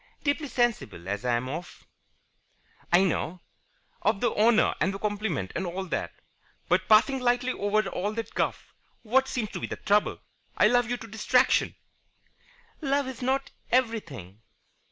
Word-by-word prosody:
"Deeply 290 Hz, +1 st, 0 dB
sensible 230 Hz, -, -1 dB
as 100 Hz, +1 st, -3 dB
I 125 Hz, -1 st, +2 dB
am 120 Hz, +2 st, -2 dB
of 160 Hz, +6 st, -7 dB, 0.5 s
" -, -, -43 dB, 0.3 s
"I 175 Hz, +2 st, +6 dB
know. 180 Hz, -1 st, -1 dB, 0.6 s
Of -, -, +1 dB
the 240 Hz, +1 st, +1 dB
honour 220 Hz, +1 st, +4 dB
and 190 Hz, -, +2 dB
the 195 Hz, -, -5 dB
compliment 205 Hz, -, -2 dB
and -, -, -2 dB
all 185 Hz, +2 st, -4 dB
that. 180 Hz, -, -3 dB, 0.6 s
But, 185 Hz, +2 st, +2 dB
passing 235 Hz, +5 st, +5 dB
lightly 250 Hz, 0 st, +1 dB
over 205 Hz, -1 st, 0 dB
all 205 Hz, +4 st, -2 dB
that 225 Hz, 0 st, -5 dB
guff, -, -, -2 dB, 0.3 s
what 265 Hz, +4 st, +3 dB
seems 225 Hz, -5 st, -3 dB
to -, -, -5 dB
be -, -, -4 dB
the -, -, -4 dB
trouble? 205 Hz, 0 st, +1 dB, 0.4 s
I 210 Hz, -, +5 dB
love 245 Hz, 0 st, +2 dB
you 245 Hz, -, -1 dB
to 225 Hz, -, -10 dB
distraction 220 Hz, +4 st, +2 dB, 0.6 s
" -, -, -32 dB, 0.3 s
"Love 280 Hz, -1 st, +1 dB
is 260 Hz, -2 st, -7 dB
not 265 Hz, +2 st, 0 dB, 0.2 s
everything." 170 Hz, -, -1 dB
215 Hz, 165 wpm, -27 LUFS, 180-245 Hz, 0.6 s, I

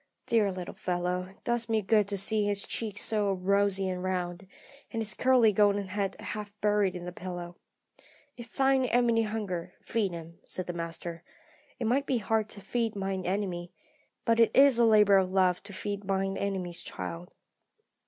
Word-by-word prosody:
Dear 215 Hz, -4 st, +2 dB
little 185 Hz, -1 st, -6 dB
fellow; 180 Hz, 0 st, -2 dB
it 195 Hz, -, -21 dB
does 235 Hz, -1 st, -1 dB
me 220 Hz, -2 st, +1 dB
good 210 Hz, 0 st, +3 dB
to 200 Hz, 0 st, -2 dB
see 210 Hz, +2 st, +2 dB
his 205 Hz, -1 st, 0 dB
cheeks 210 Hz, -3 st, -3 dB
so 210 Hz, -3 st, +1 dB
rosy 195 Hz, +1 st, +1 dB
and 180 Hz, -1 st, -3 dB
round, 185 Hz, 0 st, -3 dB, 0.4 s
and 225 Hz, -, -4 dB
his 215 Hz, -3 st, -2 dB
curly 245 Hz, -2 st, +4 dB
golden 205 Hz, -1 st, +3 dB
head 200 Hz, 0 st, -2 dB
half 210 Hz, -1 st, -5 dB
buried 205 Hz, -3 st, +2 dB
in 175 Hz, -1 st, -6 dB
the 180 Hz, -, -5 dB
pillow. 175 Hz, -1 st, -7 dB, 0.8 s
'If 240 Hz, -1 st, -10 dB
thine 270 Hz, -1 st, +3 dB
enemy 240 Hz, -2 st, +3 dB
hunger, 210 Hz, -6 st, -3 dB
feed 215 Hz, -5 st, 0 dB
him,' 170 Hz, 0 st, -9 dB
said 185 Hz, -, -5 dB
the 175 Hz, -, -4 dB
Master. 170 Hz, 0 st, -6 dB, 0.5 s
It 245 Hz, -, -3 dB
might 270 Hz, +5 st, +1 dB
be 260 Hz, -, +2 dB
hard 220 Hz, 0 st, 0 dB
to 200 Hz, -, -9 dB
feed 225 Hz, +2 st, -1 dB
mine 195 Hz, -2 st, -3 dB
enemy, 180 Hz, -3 st, -2 dB, 0.5 s
but 230 Hz, -1 st, +3 dB
it 230 Hz, -, +6 dB
is 270 Hz, -3 st, +6 dB
a 235 Hz, -, +6 dB
labour 210 Hz, -3 st, +6 dB
of 185 Hz, -1 st, -1 dB
love 185 Hz, -2 st, +3 dB
to 200 Hz, -, -10 dB
feed 200 Hz, +1 st, -4 dB
mine 195 Hz, 0 st, -1 dB
enemy's 185 Hz, -3 st, -3 dB
child. 170 Hz, +1 st, -6 dB
200 Hz, 180 wpm, -29 LUFS, 185-220 Hz, 0.8 s, it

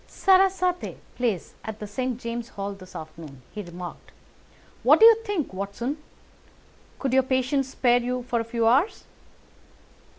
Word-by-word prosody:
"Sarasate 375 Hz, -2 st, +2 dB, 0.2 s
plays 230 Hz, -8 st, -1 dB
at 220 Hz, -1 st, -6 dB
the 215 Hz, -, -6 dB
St. 245 Hz, +4 st, -3 dB
James's 235 Hz, 0 st, -5 dB
Hall 200 Hz, 0 st, -3 dB
this 185 Hz, -2 st, -14 dB
afternoon," 155 Hz, -4 st, -9 dB
he 210 Hz, -, -4 dB
remarked. 175 Hz, -1 st, -9 dB, 0.7 s
"What -, -, +6 dB
do 445 Hz, -, +9 dB
you 460 Hz, -, +11 dB
think, 400 Hz, -, -2 dB
Watson? 200 Hz, +9 st, -3 dB, 1.0 s
Could 270 Hz, -2 st, -2 dB
your 265 Hz, -, +6 dB
patients 260 Hz, +1 st, 0 dB
spare 245 Hz, -2 st, +3 dB
you 250 Hz, +1 st, -2 dB
for 240 Hz, -1 st, -1 dB
a -, -, -1 dB
few 230 Hz, 0 st, -1 dB
hours?" 275 Hz, -, +3 dB
240 Hz, 145 wpm, -25 LUFS, 200-270 Hz, 1.0 s, you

